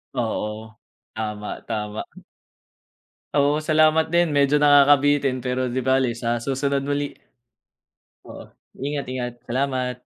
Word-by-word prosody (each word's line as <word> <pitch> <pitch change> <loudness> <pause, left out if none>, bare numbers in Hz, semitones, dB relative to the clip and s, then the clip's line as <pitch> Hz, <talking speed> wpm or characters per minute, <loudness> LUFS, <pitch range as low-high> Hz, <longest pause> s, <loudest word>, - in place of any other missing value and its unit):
Oo. 110 -2 -3 0.4
Tama, 105 -1 -5
tama. 105 -1 -3 1.3
Oo, 145 +2 +2
salamat 155 0 +3
din. 175 0 +4
Medyo 140 0 +3
nakakabitin 145 -1 +4
pero 125 0 -1
'di 130 +2 -2
bale 130 -1 +3
sa 120 0 -2
susunod 140 +1 -1
muli. 145 +1 -1 1.2
Oo, - - -10 0.4
ingat, 145 -1 -3
ingat. 125 -1 -3 0.2
Salamat. 130 0 -1
135 Hz, 105 wpm, -23 LUFS, 120-145 Hz, 1.3 s, din